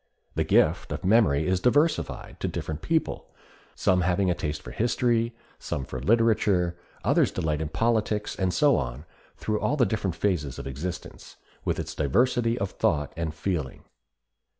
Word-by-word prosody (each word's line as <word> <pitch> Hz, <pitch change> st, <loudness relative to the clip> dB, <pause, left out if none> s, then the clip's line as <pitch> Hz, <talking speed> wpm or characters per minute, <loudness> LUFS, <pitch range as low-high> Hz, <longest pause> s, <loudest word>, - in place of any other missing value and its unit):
The -, -, +1 dB
gift -, -, +2 dB
of -, -, -4 dB
memory 95 Hz, -8 st, +4 dB
is 95 Hz, 0 st, +1 dB
diversified 145 Hz, -, +1 dB
to -, -, -1 dB
different 80 Hz, 0 st, -4 dB
people, 165 Hz, -1 st, -1 dB, 0.5 s
some 90 Hz, -1 st, +2 dB
having 90 Hz, +1 st, +2 dB
a -, -, +3 dB
taste 75 Hz, -3 st, -4 dB
for -, -, -8 dB
history, 115 Hz, 0 st, +1 dB, 0.2 s
some 65 Hz, -, -4 dB
for 65 Hz, -, -6 dB
literature; 105 Hz, -, +2 dB, 0.3 s
others -, -, +3 dB
delight 75 Hz, -1 st, -1 dB
in 80 Hz, -, -2 dB
politics, 110 Hz, +2 st, 0 dB
and 95 Hz, -1 st, 0 dB
so 145 Hz, +6 st, +4 dB
on 65 Hz, +2 st, -4 dB, 0.3 s
through 105 Hz, -1 st, -1 dB
all 150 Hz, -, 0 dB
the 125 Hz, -, +4 dB
different 100 Hz, -7 st, -1 dB
phases 80 Hz, -8 st, -1 dB
of 70 Hz, -, -7 dB
existence, 75 Hz, +7 st, -6 dB, 0.3 s
with -, -, -1 dB
its -, -, -4 dB
diversity 115 Hz, -, +2 dB
of 100 Hz, -5 st, -2 dB
thought 75 Hz, -1 st, 0 dB
and 80 Hz, -1 st, -3 dB
feeling. 80 Hz, -5 st, -3 dB
95 Hz, 160 wpm, -26 LUFS, 75-115 Hz, 0.5 s, memory